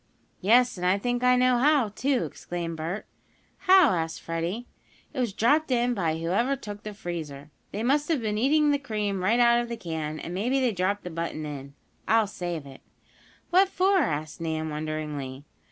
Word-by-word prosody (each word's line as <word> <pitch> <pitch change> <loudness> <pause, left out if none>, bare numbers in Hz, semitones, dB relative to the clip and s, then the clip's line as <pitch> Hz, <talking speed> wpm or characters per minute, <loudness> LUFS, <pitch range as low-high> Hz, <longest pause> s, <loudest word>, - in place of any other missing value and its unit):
"Yes, 240 +4 +4
and 180 - -6
I 185 +2 +3
think 245 +4 -1
I 250 0 +5
know 250 -1 +3
how, 280 -4 +4
too!" 255 +5 0
exclaimed 170 -2 -5
Bert. 165 +6 -4 0.6
"How?" 375 -5 +8
asked 165 -2 -2
Freddie. 170 +8 -3 0.5
"It 280 - -4
was 240 -4 0
dropped 285 +10 +2
in 245 -1 +2
by 165 -7 0
whoever 195 +12 +1
took 205 -6 -8
the 210 -1 -7
freezer. 155 -6 -6 0.2
They 215 - -3
must 285 +4 +2
have 325 -4 +1
been 215 -2 -2
eating 295 +4 +3
the 285 - +1
cream 210 -7 -2
right 225 +6 +3
out 235 0 +5
of 240 - -6
the 235 - -4
can, 160 -5 -4
and 170 - -6
maybe 245 +9 0
they 255 -3 +2
dropped 200 +1 -1
the 180 - -6
button 165 -1 -4
in. 140 -1 -7 0.3
I'll 225 0 +4
save 175 -6 -5
it." 135 -1 -12 0.7
"What 375 +2 +5
for?" 385 +1 +3
asked 155 - -2
Nan, 160 -1 -2
wonderingly. 150 -3 -4
205 Hz, 185 wpm, -27 LUFS, 165-250 Hz, 0.7 s, How